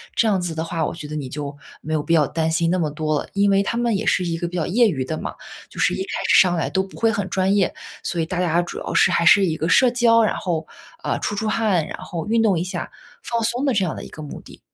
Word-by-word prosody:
这 230 - +3
样 200 -3 +2
子 175 -2 -3
的 160 - -3
话， 165 -1 -2
我 - - -3
觉 155 -3 -8
得 155 - -6
你 140 -4 -4
就 145 0 -6 0.2
没 155 - -4
有 155 -2 0
必 165 - 0
要 155 -4 +4
担 160 +2 -1
心 165 +1 +1
那 185 - +1
么 160 -4 0
多 155 -1 -1
了。 - - -15
因 200 0 +3
为 195 0 +3
他 230 - -2
们 235 -2 +1
也 210 +3 -2
是 185 - +2
一 165 -1 -2
个 170 0 -3
比 180 - -5
较 165 - 0
业 230 +4 +3
余 135 -8 -2
的 155 +4 -3
嘛， - - -5 0.4
就 - - -11
是 - - +3
一 - - -3
开 380 - -3
始 - - +6
上 180 -2 +2
来 165 - -1
都 190 - 0
不 190 - -12
会 225 - +3
很 205 -3 -1
专 190 +1 +1
业。 195 -3 +2 0.3
所 175 - -2
以 165 - +1
大 175 +2 -2
家 170 -1 +2
主 175 - -7
要 - - -5
是， - - +5
还 170 - +2
是 195 +3 +7
一 165 -3 -1
个 160 +2 -2
社 255 +5 +5
交， 235 -2 +4
然 215 - +1
后， 165 -4 -3 0.4
呃， - - -1
出 - - -2
出 220 +2 -2
汗， 210 -6 +1
然 - - -6
后 165 -2 -6
运 225 +1 +2
动 195 -6 +2
一 - - -1
下， 185 - -5 0.3
放 235 -1 -2
松 235 +4 0
的 270 - +2
这 195 -4 +2
样 170 - -3
的 - - -7
一 - - -9
个 155 - -10
目 150 - -8
的。 - - -15
180 Hz, 335 characters per minute, -22 LUFS, 160-205 Hz, 0.4 s, 是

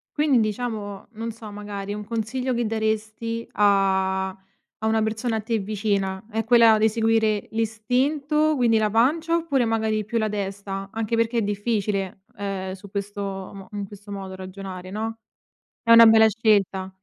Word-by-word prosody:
Quindi, 295 -4 +3
diciamo 215 -2 -3
non 230 +1 -4
so, 220 -1 -10
magari 205 -1 -6
un 210 - -5
consiglio 235 +4 -2
che 240 0 0
daresti 220 +1 -2
a 190 -2 +2
a 195 +3 -13
una 220 0 +2
persona 220 +1 -1
a - - -3
te 225 +1 -1
vicina: 200 -2 -1
è 225 0 -1
quella 230 -1 +6
di 220 +1 +4
seguire 220 -1 +1
l'istinto, 270 +8 +1
quindi 235 -4 +3
la 215 -1 +1
pancia? 305 +9 +2
Oppure, 280 -7 +1
magari 220 -1 0
più 230 +2 -1
la 215 -1 0
testa? 195 -1 -4
Anche 225 0 -1
perché 230 +1 +1
è - - +1
difficile, 205 -2 -2
ehm, 195 -2 -4
su 195 +1 -12
questo 200 0 -4
mo 195 0 -6
in 200 -1 -5
questo 205 0 -12
modo 190 -1 -6
ragionare, 185 -1 -8
no, 225 +2 -3 0.7
è 230 - -1
una 230 0 +10
bella 220 0 +7
scelta. 205 -4 +1
215 Hz, 160 wpm, -24 LUFS, 200-230 Hz, 0.7 s, una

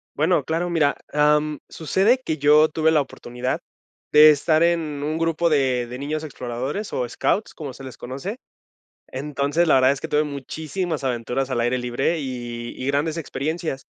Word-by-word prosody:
Bueno, 155 +1 +2
claro, 170 +2 -1
mira, 155 -4 +2 0.2
am, 150 0 +2
sucede 195 - +2
que 160 - -2
yo 150 +2 +5
tuve 160 +1 +2
la 155 -2 +4
oportunidad 125 -1 -4 0.5
de 155 +1 +9
estar 155 +2 +3
en 170 0 +4 0.2
un 155 +2 -2
grupo 165 +1 +1
de 130 -5 +1
de 125 +1 -7
niños 150 +3 -3
exploradores 135 - -5
o 125 -2 -1
scouts, 210 - -1
como 145 -5 -6
se 135 - -12
les 130 - -9
conoce. 140 - -6 0.7
Entonces 145 +4 -1
la 155 - +5
verdad 130 0 +5
es 140 - -1
que - - -4
tuve 150 +1 +2
muchísimas 155 +3 -4
aventuras 130 +1 -2
al 120 -2 0
aire 120 +2 +1
libre 125 +7 -1
y 120 -3 -5
y 130 - -3
grandes 145 +3 0
experiencias. 155 -1 -4
150 Hz, 175 wpm, -23 LUFS, 130-160 Hz, 0.7 s, de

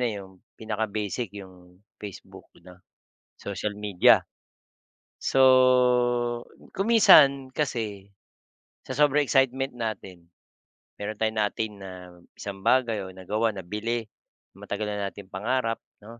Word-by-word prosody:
na 125 - +1
yung 95 -1 -10 0.2
pinaka-basic 110 +1 -3
yung 90 -1 -14 0.2
Facebook 100 -3 -11 0.2
'no, 90 0 -15 0.6
social 100 +1 -4
media. 100 -4 +4 0.9
So, 135 - 0 1.3
kung 195 - -3
minsan, 140 - +6
kasi, 110 -8 -4 0.7
sa - - -8
sobrang 150 0 +3
excitement 135 -1 +1
natin, 105 -7 -6 0.7
meron 105 +1 -4
tayong 110 0 -1
na-attain 105 +1 -1
na 95 -1 -8 0.5
isang 100 -1 -6
bagay 120 -4 +2
o 95 - -9
nagawa, 105 +5 -1
nabili, 105 +5 -3 0.5
matagal 105 +1 -5
na 100 -1 -2
nating 100 -1 -13
pangarap, 115 +3 -1 0.2
'no? 115 +2 -12
105 Hz, 110 wpm, -26 LUFS, 100-125 Hz, 1.3 s, minsan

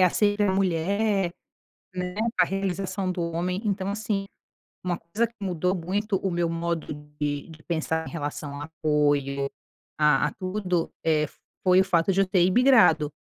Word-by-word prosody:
é, 185 - +7
sempre 205 0 +2
a 190 - +2
mulher, 195 +1 +1 0.6
né. 180 0 -4 0.2
A 180 - +7
realização 190 0 -2
do 180 -1 -3
homem. 175 +3 -2
Então 195 -2 -1
assim, 205 -1 -2 0.6
uma 175 -1 -1
coisa 205 +8 -1
que 230 - -25
mudou 180 -1 0
muito 195 +4 -1
o 190 -1 -2
meu 170 -1 0
modo 165 -2 -2 0.3
de 145 -1 -2
de 155 -1 -13
pensar 160 -1 -1
em - - -7
relação 145 -2 -5
a - - -4
apoio, 145 -3 0 0.5
a 150 -2 +4
a 145 - -4
tudo, 185 -3 -2
eh, 155 -1 +3 0.4
foi 185 0 +6
o - - +3
fato 180 0 +2
de 195 +1 +3
eu - - +3
ter 185 -2 +3
imigrado. 185 - +5
180 Hz, 170 wpm, -26 LUFS, 160-195 Hz, 0.6 s, é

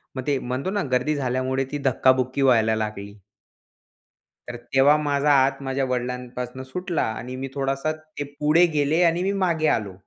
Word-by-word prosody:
मग 130 +1 -5
ते 140 -2 +2
म्हणतो 130 +7 -3
ना, 205 0 -1
गर्दी 130 +4 +1
झाल्यामुळे 130 0 -1
ती 145 - -2
धक्का-बुक्की 130 0 +2
व्हायला 115 -4 +4
लागली. 105 -2 -4 1.4
तर 120 - -6 0.2
तेव्हा 140 +3 +6
माझा 145 -1 +1
हात 135 0 +2
माझ्या 135 0 -1
वडिलांपासून 125 0 -4
सुटला 175 +6 -3 0.2
आणि 125 +2 -7
मी 135 +1 -5
थोडासा 135 +2 -1
ते 155 -2 -8 0.2
पुढे 155 +4 +4
गेले 150 +3 +2
आणि 170 +1 +2
मी 195 - 0
मागे 160 -3 +1
आलो. 100 -4 -7
135 Hz, 160 wpm, -23 LUFS, 125-150 Hz, 1.4 s, तेव्हा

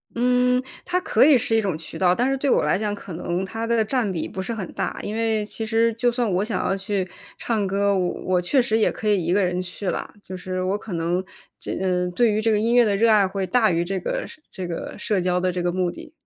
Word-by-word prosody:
嗯， 250 +1 +3 0.2
它 360 0 +1
可 - - +4
以 295 -3 +7
是 225 -1 0
一 225 - +4
种 190 -6 -1
渠 160 - -7
道， 180 -1 +4
但 245 +5 +1
是 270 - 0
对 275 +1 0
我 - - +3
来 - - +2
讲， 205 0 -2
可 195 -3 -9
能 175 +2 -2
它 225 +4 -4
的 230 -1 +2
占 230 -1 0
比 170 -4 -3
不 190 - -5
是 210 +5 -3
很 195 -6 -5
大。 - - -3
因 210 - -4
为 220 -2 0
其 225 +1 -5
实 225 +1 +2
就 235 +2 +1
算 240 -2 0
我 185 +2 +1
想 215 -4 -2
要 - - +1
去 195 -1 -2 0.3
唱 215 -4 -1
歌， 200 +1 +1
我 180 -1 +1
我 185 -1 +1
确 255 +10 +3
实 220 -2 +1
也 220 - +3
可 215 - -5
以 200 -4 +2
一 170 +2 +1
个 200 +1 +3
人 180 0 0
去 185 +2 -4
啦， - - -3
就 185 - -7
是 185 0 -3
我 190 +2 0
可 210 -2 -8
能 170 +2 0 0.4
这 - - -5 0.4
对 235 +2 +4
于 210 +1 0
这 225 +1 +2
个 210 - +2
音 230 +2 +1
乐 245 -1 +6
的 205 -2 +1
热 225 +3 +3
爱 205 -3 +5
会 190 0 -2
大 230 +2 +3
于 170 -1 +1
这 190 +2 -2
个 - - -3 0.3
这 185 - -5
个 170 - -5
社 205 -1 0
交 180 0 +1
的 185 0 0
这 180 0 -3
个 175 0 0
目 180 -1 0
的。 330 - -11
205 Hz, 290 characters per minute, -23 LUFS, 185-230 Hz, 0.4 s, 以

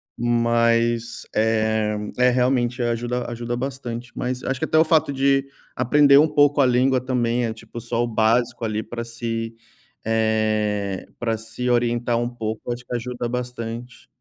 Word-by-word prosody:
mas, 115 0 +1
eh, 110 -1 +1 0.2
é, 125 0 +5
realmente 125 0 +1
ajuda 120 +1 -2
ajuda 120 0 -4
bastante, 125 -2 -5
mas 125 0 -3
acho 135 -1 -2
que - - 0
até 155 - +4
fato 160 -3 +2
de 135 0 +1 0.3
aprender 140 +3 +5
um 155 - +5
pouco 145 -1 +3
a - - +5
língua 130 +1 +3
também, 125 -1 0
é 115 - -2
tipo, 110 +1 -10
só 120 +1 -1
o - - -1
básico 115 +2 +1
ali, 110 -1 -1
para 120 0 -6
se 115 -1 -4 0.5
eh, 110 -3 0
pra 115 -1 -1
se 115 +3 -5
orientar 120 0 +1
um 120 0 -1
pouco, 110 -1 -5
acho 120 +1 -6
que 120 - -4
ajuda 120 0 -3
bastante. 120 0 -6
120 Hz, 155 wpm, -22 LUFS, 115-125 Hz, 0.5 s, é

